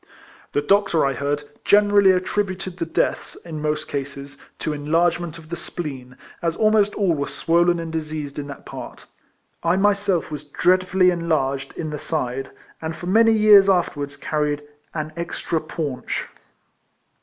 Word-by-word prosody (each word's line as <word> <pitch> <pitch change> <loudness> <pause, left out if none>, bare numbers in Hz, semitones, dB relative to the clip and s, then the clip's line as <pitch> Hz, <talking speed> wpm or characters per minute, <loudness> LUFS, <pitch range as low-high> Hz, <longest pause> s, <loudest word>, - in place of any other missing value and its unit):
The 145 - +1
doctor, 195 -2 +3
I 135 - +1
heard, 145 +2 -2 0.2
generally 205 -1 +5
attributed 185 0 0
the 165 -2 -2
deaths, - - -1
in 155 -3 -6
most 150 0 -1
cases, 140 0 -5 0.2
to 155 - -2
enlargement 165 +2 0
of 160 -1 -14
the 170 - -3
spleen, 135 -7 -7 0.2
as 165 -1 0
almost 215 -1 +3
all 195 -5 +2
were 140 -2 -2
swollen 170 +1 +2
and 165 -1 -5
diseased 155 -3 -4
in 145 - -5
that 140 - -9
part. - - -9 0.6
I 170 +1 +2
myself 200 -3 +1
was 150 -1 -5
dreadfully 185 +4 +3
enlarged 140 -6 -1
in 155 -2 -3
the 150 - -4
side, 135 -4 -2 0.3
and 160 0 -4
for 175 - -8
many 225 +5 +5
years 210 -2 +7
afterwards 145 -6 0
carried 150 -1 -1 0.2
" - - -42
an 155 +1 -8
extra 170 -1 -2
paunch." 150 -4 -4
165 Hz, 155 wpm, -22 LUFS, 145-185 Hz, 0.6 s, years